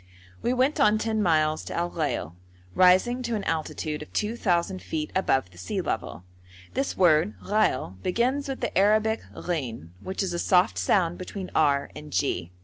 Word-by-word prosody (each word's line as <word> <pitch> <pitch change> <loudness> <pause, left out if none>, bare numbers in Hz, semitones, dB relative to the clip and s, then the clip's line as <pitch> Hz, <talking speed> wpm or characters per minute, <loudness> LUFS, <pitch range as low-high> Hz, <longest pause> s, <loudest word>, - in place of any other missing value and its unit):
We 240 - 0
went 260 +5 +1
on 215 -6 +5
ten 220 0 -1
miles 155 -4 +2
to - - -6
Al 175 +1 -1
Ghail, 145 - -2 0.4
rising 185 - +4
to 235 -2 -2
an 205 - -3
altitude 155 -2 -3
of 150 - -10
2,000 190 -4 0
feet 155 -1 -4
above 135 - +1
the 90 - -15
sea 90 - -3
level. 90 - -3 0.5
This 270 +2 -2
word 175 +2 +4
ghail 160 - 0
begins 255 +9 0
with 270 - -4
the - - -2
Arabic 215 +3 +3 0.2
ghin, 125 - -3
which 190 +2 -3
is 180 -2 -2
a 175 - -2
soft 180 0 +3
sound 175 -4 +1
between 185 0 -6
r 140 -2 +2
and 150 0 -9
g. 90 -13 -1
180 Hz, 170 wpm, -26 LUFS, 155-215 Hz, 0.5 s, on